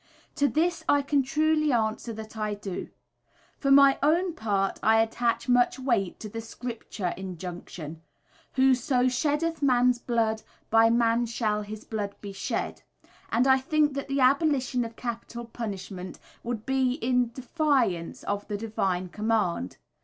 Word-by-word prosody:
To 285 - +4
this 335 +2 0
I 285 0 +4
can 280 0 +2
truly 305 +2 +2
answer 225 0 0
that 220 0 -8
I 215 -1 -2
do. 200 -3 -6 0.7
For 275 - 0
my 275 0 +7
own 335 +5 +2
part 200 -6 -1
I 220 +1 +4
attach 230 +2 0
much 245 +1 +3
weight 235 -8 0
to 215 - -5
the 225 +2 -6
Scripture 225 -5 -5
injunction, 175 -3 -7 0.5
"Whoso 260 -1 +3
sheddeth 295 +5 0
man's 250 -2 +3
blood, 225 -2 0 0.3
by 225 0 +6
man 235 0 +2
shall 215 -2 -1
his 210 +1 -8
blood 205 -2 -4
be 200 -1 -8
shed," 195 - -3 0.5
and 240 +3 +3
I 265 0 +5
think 295 +2 +2
that 275 0 -4
the 275 0 0
abolition 265 -2 +3
of 230 0 -7
capital 235 0 -5
punishment 195 -5 -6 0.2
would 230 -2 -4
be 265 -1 +1
a 255 +2 +1
defiance 245 - 0
of 205 0 -3
the 205 -1 -3
divine 190 -4 -1
command. 210 - -1
235 Hz, 145 wpm, -27 LUFS, 210-270 Hz, 0.7 s, my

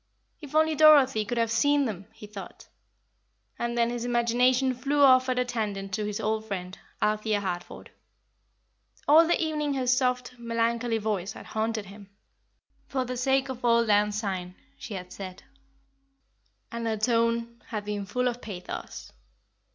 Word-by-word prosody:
If 295 -1 -9
only 315 0 +4
Dorothy 280 -7 +6
could 240 +3 -3
have 230 -1 +1
seen 285 +5 +3
them! 200 -5 -5
he - - -12
thought. 205 -2 -10 0.9
And 235 0 -2
then 235 0 +2
his 240 -1 -4
imagination 245 +2 +2
flew 280 +3 +1
off 255 -1 +6
at 255 - 0
a 250 - +2
tangent 205 -5 -3
to 210 +1 -1
his 210 -1 -3
old 220 0 -1
friend, 185 -3 -5 0.3
Althea 215 0 +1
Harford. 180 -3 -6 1.2
All 315 +3 +7
the 345 - +2
evening 300 -3 -1
her 260 -1 -1
soft, 250 -1 0
melancholy 230 0 0
voice 210 -2 -2
had - - -11
haunted 220 -1 -2
him. 200 0 -13 0.8
"For 260 -2 -2
the 250 +1 -4
sake 265 +2 +1
of 255 -2 -6
auld 235 -1 +4
lang 210 0 +4
syne" 190 -4 -4 0.2
she 220 - -8
had 180 -1 -8
said, 185 -2 -8 1.3
and 235 0 -3
her 220 -1 0
tone 230 +1 0
had 210 -2 -4
been 205 -1 -4
full 250 +4 0
of 245 0 -3
pathos. 185 -5 -7
235 Hz, 160 wpm, -27 LUFS, 210-255 Hz, 1.3 s, All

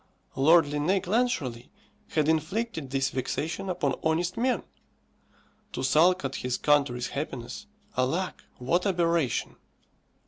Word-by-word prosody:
Lord 160 +4 +6
Linnæus 150 +6 0
Clancharlie 180 - -1 0.4
had 155 -2 0
inflicted 160 - -1
this 135 0 0
vexation 160 +8 -3
upon 145 -7 0
honest 170 +3 0
men. 250 +2 +1 1.1
To - - -3
sulk 180 +4 +4
at - - -3
his 125 -1 -2
country's 140 -5 +2
happiness, 140 - -5 0.3
alack, 160 +9 -1
what 170 +10 +1
aberration! 170 - 0
160 Hz, 110 wpm, -27 LUFS, 135-180 Hz, 1.1 s, Lord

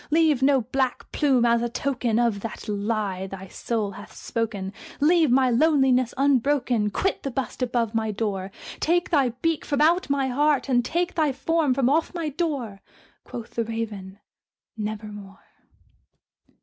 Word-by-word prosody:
Leave 310 -3 +3
no 270 -1 +4
black 255 +2 -2
plume 265 -5 +2
as 235 0 +3
a 240 - -1
token 245 -3 -1
of 235 -4 +2
that 225 +2 -7
lie 205 -2 -2
thy 190 0 -8
soul 215 +1 -2
hath 205 +2 -11
spoken! 210 -4 -3 0.3
Leave 320 +1 +4
my 255 0 +4
loneliness 260 -2 +3
unbroken! 260 -5 +2
quit 385 - -1
the 275 - -3
bust 265 +1 -4
above 240 -3 0
my 220 -1 0
door! 200 -3 -3 0.3
Take 350 +3 +1
thy 280 -6 +3
beak 330 -2 +1
from 285 -2 -1
out 330 +2 +3
my 275 -1 +1
heart, 285 +3 +2
and 245 -2 +2
take 345 +6 -1
thy 310 -4 +2
form 305 0 +1
from 265 -2 +2
off 320 +6 +1
my 330 -3 -2
door!" 275 - -3 0.4
Quoth 235 -2 -8
the 230 - 0
Raven, 215 -4 -5 0.6
"Nevermore." 210 -2 -7
250 Hz, 155 wpm, -25 LUFS, 215-285 Hz, 0.6 s, no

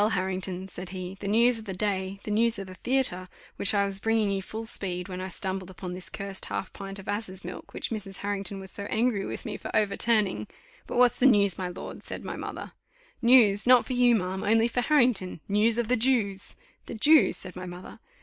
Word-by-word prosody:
Harrington," 185 0 -3
said 180 -1 -8
he, 185 0 -6
"the 200 - -5
news 230 +3 +3
of 220 - -11
the 190 -3 -5
day, 195 -1 -2
the 210 - -5
news 230 +2 +2
of 195 - -6
the 185 - -10
theatre, 185 -5 -1 0.3
which 200 - 0
I 200 0 +3
was 195 -1 -4
bringing 225 -1 +1
you 195 -1 -1
full 220 +4 -7
speed, 180 -4 -2
when 185 -1 -6
I 185 - -4
stumbled 190 0 -4
upon 185 -1 -7
this 180 0 -7
cursed 200 -1 -6
half 195 - -5
pint 195 0 -8
of 195 - -11
asses' 200 -3 -4
milk, 180 - -8
which - - -5
Mrs.. 200 -3 -5
Harrington 200 -1 -2
was 190 0 0
so 200 - +1
angry 220 -2 0
with - - -6
me 210 -3 -4
for - - -8
overturning 210 - +2 0.2
" - - -28
"But - - -4
what's 245 -1 +4
the 265 - +6
news, 200 -6 +4
my 185 - -2
lord?" 180 - -8
said - - -7
my - - -5
mother. - - -7 0.5
"News! 235 -4 +6
not 250 -1 +6
for 255 - -4
you, 245 -1 +4
ma'am, 190 -2 -2
only 225 +2 +3
for 245 +1 -1
Harrington; 245 - +2
news 215 +3 +4
of 240 -2 0
the 250 - +2
Jews." 220 -5 0 0.3
"The - - -6
Jews!" 300 +7 +5
said 185 -1 +2
my 180 0 -7
mother. 180 +1 -10
200 Hz, 225 wpm, -27 LUFS, 190-225 Hz, 0.5 s, the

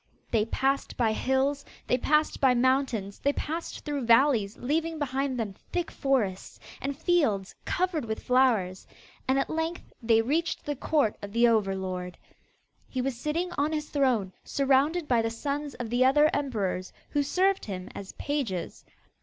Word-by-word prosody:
They 215 -2 +2
passed 270 +4 -1
by 230 -3 +2
hills, 265 +5 0 0.2
they - - +2
passed 305 +4 +2
by 260 -2 +5
mountains, 245 -5 +1
they 285 - +1
passed 325 +4 -4
through 290 -4 -2
valleys, 230 -4 +4
leaving 320 +5 -1
behind 270 -2 -1
them 210 -4 -2 0.2
thick 350 -1 -2
forests, 235 -10 -1 0.2
and 275 0 -3
fields 290 - +1
covered 355 -7 0
with 220 -1 -4
flowers; 230 -8 +2 0.4
and 265 +1 +3
at 275 - +1
length 320 +2 -3
they 225 -1 +4
reached 320 +7 -1
the 290 - -2
court 275 -5 +1
of 205 0 -7
the 235 +1 +5
over 210 -4 +2
lord. 185 -1 -4 0.7
He 260 - -3
was 260 0 -1
sitting 315 +8 -2
on 300 +2 +1
his 300 -1 -3
throne, 245 -10 +1
surrounded 280 +4 +2
by 240 -2 +3
the 225 - 0
sons 285 +4 -3
of 240 -2 -5
the 245 +1 +3
other 295 +4 +5
emperors, 210 -10 -2 0.2
who 290 - +2
served 380 +6 +1
him 185 -3 -5
as 195 -1 -8
pages. 260 - -3
265 Hz, 160 wpm, -28 LUFS, 225-295 Hz, 0.7 s, by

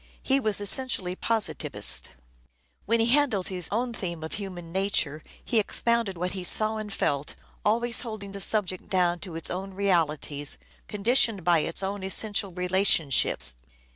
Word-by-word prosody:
He 270 +1 +2
was 215 -6 +2
essentially 205 -4 0
positivist. 225 +1 0 0.7
When 230 +2 +2
he 225 - +3
handled 240 -7 +3
his 180 -2 +1
own 235 +3 -1
theme 170 -6 -5
of 160 - -6
human 180 -5 -7
nature 185 -6 0 0.2
he 235 - +2
expounded 230 -2 0
what 180 +2 -2
he 185 -1 -5
saw 215 +4 +3
and 215 -1 -6
felt, 145 -6 -2 0.3
always 235 +2 +2
holding 215 -4 -7
the 200 0 -7
subject 190 -3 -1
down 175 -2 +1
to 170 -1 -7
its 165 - -1
own 190 +1 -5
realities, 155 -7 0 0.3
conditioned 225 -1 +2
by 170 -1 +3
its 165 +5 -1
own 200 +1 -3
essential 200 +1 +1
relationships. 170 - +2
195 Hz, 150 wpm, -26 LUFS, 175-220 Hz, 0.7 s, he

